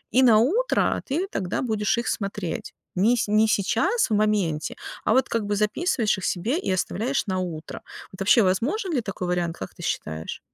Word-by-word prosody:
И 260 - +6
на 225 -4 +7
утро 400 - +2
ты 350 +7 0
тогда 185 -2 -2
будешь 220 -2 0
их 235 - -2
смотреть. 195 -4 -3 0.2
Не 210 +6 +4
с - - 0
не 215 +1 +4
сейчас, 220 - +1
в - - 0
моменте, 205 -8 0 0.3
а - - +3
вот 260 +2 +3
как 230 -2 0
бы 205 0 -1
записываешь 215 - +1
их 190 - -5
себе 230 - 0
и - - +1
оставляешь 225 +8 -1
на 185 -1 -1
утро. 170 -4 -5 0.3
Вот 190 - -13
вообще, 230 +4 +5
возможен 290 - 0
ли 255 - +1
такой 195 -4 -5
вариант, 175 -2 -1
как 95 - -7
ты - - -12
считаешь? 80 +1 -4
210 Hz, 195 wpm, -24 LUFS, 185-245 Hz, 0.3 s, на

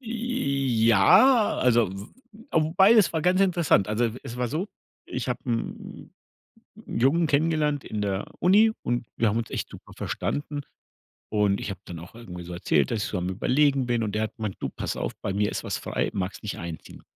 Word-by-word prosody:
Ja, 140 - +3
also 120 -5 +3
w 95 +1 -8 0.4
a - - +3
wobei, 190 +7 +5
es 215 -6 +4
war 160 - 0
ganz 185 +2 +3
interessant. 170 - +3
Also, 110 +3 +1
e 115 - 0
es 120 - -7
war 125 -1 -1
so, 170 - -3 0.4
ich 125 0 -4
habe 125 0 -2
'n 115 -1 -5 0.7
'n - - -15
'n - - -4
Jungen 155 +6 +3
kennengelernt 150 -1 +1
in 105 -1 -4
der 100 -1 -1
Uni 210 +5 +5
und 120 -1 -1
wir 115 - +2
haben 105 +2 +1
uns 115 - -3
echt - - -3
super - - -13
verstanden. 145 0 -3 0.7
Und 105 -2 +1
ich - - -4
habe 95 -3 -6
dann 85 -2 -8
auch 90 +6 -12
irgendwie 90 -7 -9
so 90 +1 -8
erzählt, 85 -5 +1
dass 110 -3 -1
ich - - -3
so 95 - -2
am 90 +1 -2
Überlegen 135 +7 +2
bin. 120 -1 0
Und 105 -1 -2
der 110 - +1
hat 110 - -5
gemeint: 105 -3 -4
„Du, - - -3
pass - - -4
auf, - - -3
bei 95 - -2
mir 105 +1 0
ist - - -4
was - - -3
frei, - - -2
magst 95 0 -4
nicht 105 - -5
einziehen?“ 85 -1 -8
120 Hz, 210 wpm, -26 LUFS, 100-155 Hz, 0.7 s, wobei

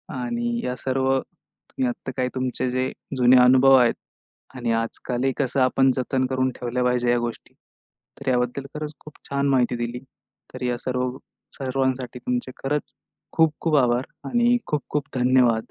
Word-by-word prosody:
आणि 240 -2 -2
या 125 - -2
सर्व 130 0 0
तुम्ही 130 - -7
आत्ता 120 - -6
काय 125 0 +1
तुमचे 130 0 -1
जे 130 +1 -1 0.3
जुने 125 +1 +6
अनुभव 130 +1 +7
आहेत 120 -2 +4 0.6
आणि 120 -2 -2
आजकालही 120 +3 -1
कसं 135 -1 0
आपण 130 +1 +4
जतन 130 0 0
करून 130 0 +1
ठेवल्या 125 +1 -1
पाहिजे 125 -1 +1
ह्या 120 - +4
गोष्टी. 120 -1 -5 0.7
तर 140 -1 -2
याबद्दल 125 +2 0
खरंच 150 0 -4
खूप 155 - -13 0.2
छान 140 0 0
माहिती 125 -2 +2
दिली. 120 +1 -3 0.5
तर 130 0 -6
या 125 -1 0
सर्व 125 0 -2 0.4
सर्वांसाठी 130 -2 -2
तुमचे 125 +1 -2
खरंच 145 +2 -2 0.4
खूप-खूप 160 -1 +2
आभार 125 -1 +3 0.3
आणि 240 0 +3
खूप-खूप 150 -1 -2
धन्यवाद! 125 -2 +4
130 Hz, 150 wpm, -24 LUFS, 125-135 Hz, 0.7 s, अनुभव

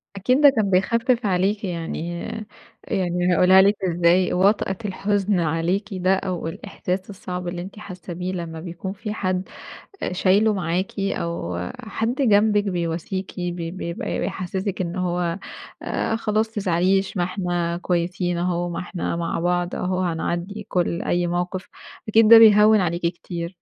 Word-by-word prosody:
أكيد 250 +9 +2
ده 290 - +9
كان 220 -7 0
بيخفف 230 +5 +2
عليكِ 195 +3 +1
يعني 170 -1 -4 0.7
يعني 180 -1 0
هاقولها 185 +2 +6
لِك 200 +2 +4
ازاي، 175 +1 +3
وطأة 190 0 +2
الحزن 200 -1 0
عليكِ 170 +6 0
ده 185 +1 +2
أو 180 -3 -3
الإحساس 185 +3 -4
الصعب 180 -2 -6
اللي 175 0 -4
أنتِ 195 +3 -9
حاسة 180 -3 -8
بيه 180 +2 -4
لمّا 165 -2 -5
بيكون 175 +3 -6
في 210 +1 -5
حد 185 -2 -2 0.5
آآ، - - -2
شايله 200 +4 +3
معاكِ، 180 +2 -2
أو 170 - -2 0.2
حد 225 +3 -2
جنبِك 210 -4 +4
بيواسيكِ 180 +2 -3
ب 175 0 -2
ب 170 +2 -5
بيبقى 170 -1 -4
بيحسسِك 190 +1 -3
إنه 180 +1 -2
هو 175 +1 -1 0.4
آآ، 225 - -1
خلاص 220 0 0
ما 220 - -27
تزعليش 190 0 +1
ما 175 - +2
إحنا 175 -2 -2
كويسين 175 0 -1
أهو، 175 0 -1
ما 170 - -4
إحنا 180 -1 -3
مع 170 0 -2
بعض 175 0 0
أهو، 185 0 -1
وهنعدّي 180 +4 -2
كل 175 -2 0
أي 175 0 0
موقف 180 +2 -3 0.4
أكيد 220 0 +5
ده 230 0 +11
بيهوّن 215 -1 +7
عليكِ 175 -1 -1
كتير. 170 0 -4
185 Hz, 150 wpm, -23 LUFS, 175-200 Hz, 0.7 s, ده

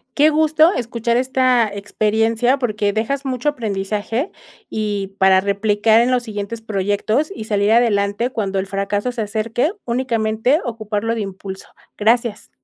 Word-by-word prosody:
Qué 300 +2 +5
gusto 315 +2 +4
escuchar 235 -1 -1
esta 255 -2 +2
experiencia, 225 +5 +1
porque 210 -5 0
dejas 265 +7 -2
mucho 260 +2 0
aprendizaje 220 - -3 0.4
y 205 -2 -3
para 190 -1 +5
replicar 205 +3 +2
en 240 +2 +2
los 250 -1 +1
siguientes 210 +1 -5
proyectos 215 - -1
y 220 - -6
salir 205 -1 +1
adelante 220 0 +2
cuando 200 -6 -2
el 190 - -1
fracaso 200 +4 -2
se 235 - -3
acerque 225 - -1
únicamente 235 +2 +1
ocuparlo 225 -2 -2
de 230 - -3
impulso, 195 -1 -7 0.3
gracias. 230 0 +1
220 Hz, 140 wpm, -19 LUFS, 205-245 Hz, 0.4 s, Qué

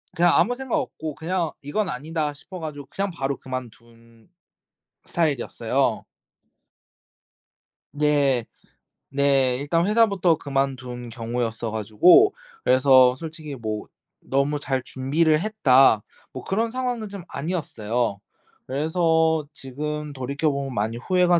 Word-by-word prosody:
그냥 175 0 +4
아무 245 +8 +3
생각 265 +4 -2
없고 160 - -5
그냥 170 -1 -2
'이건 190 +9 -1
아니다.' 150 +3 -3
싶어 180 +6 -10
가지고 150 -3 -7
그냥 200 0 -2
바로 140 -4 -2
그만둔 115 -2 -10 0.8
스타일이었어요. 155 -8 0 1.9
네. 145 -4 +2 0.7
네. 135 -2 +2
일단 165 +5 +1
회사부터 200 -6 +3
그만둔 130 -4 -3
경우였어 115 -1 -3
가지고 110 - +5 0.3
그래서 130 -1 +6
솔직히 155 -1 -7
뭐 110 -3 -4 0.4
'너무 140 +2 0
잘 130 -2 -1
준비를 155 +4 +1
했다.' 135 - +4 0.3
뭐 130 - -8
그런 225 +4 0
상황은 245 -4 -3
좀 200 -2 -8
아니었어요. 120 - -2 0.5
그래서 160 +1 +1
지금 150 +2 -5
돌이켜보면 140 +1 -2
많이 110 +1 -1
후회가 180 +5 +3
145 Hz, 265 characters per minute, -24 LUFS, 125-170 Hz, 1.9 s, 그래서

